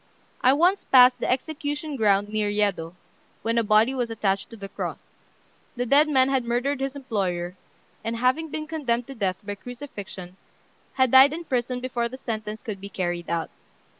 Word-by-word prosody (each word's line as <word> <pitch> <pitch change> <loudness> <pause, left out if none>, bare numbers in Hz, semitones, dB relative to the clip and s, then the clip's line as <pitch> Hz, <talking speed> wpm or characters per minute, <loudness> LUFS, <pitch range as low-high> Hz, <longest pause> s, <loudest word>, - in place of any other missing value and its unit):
I 255 - +5
once 355 +7 +3
passed 250 -1 +6
the - - -2
execution 290 +2 -2
ground 205 -4 +2
near 210 -1 0
Yedo, 200 -5 -1 0.5
when 230 +1 +1
a - - +1
body 215 +4 +4
was 245 -3 -2
attached 200 -3 -1
to 230 - -11
the 200 -1 -7
cross. 195 - -7 0.6
The 245 0 -2
dead 290 +5 +4
man 260 -3 +4
had 265 -2 +1
murdered 245 +4 -1
his 270 +1 -3
employer, 190 -9 -2 0.5
and, 225 +1 -2
having 255 +7 +1
been 310 +1 -4
condemned 265 -7 -1
to 275 - -9
death 195 -6 -1
by 205 0 -4
crucifixion, 205 -6 -9 0.6
had 260 -2 +2
died 265 +2 +8
in 335 +2 -5
prison 250 -3 -2
before 245 -2 -2
the 260 - -8
sentence 215 -4 -5
could 200 -4 -6
be 200 - -7
carried 175 -3 -3
out. 165 -1 -2
235 Hz, 180 wpm, -25 LUFS, 205-270 Hz, 0.6 s, died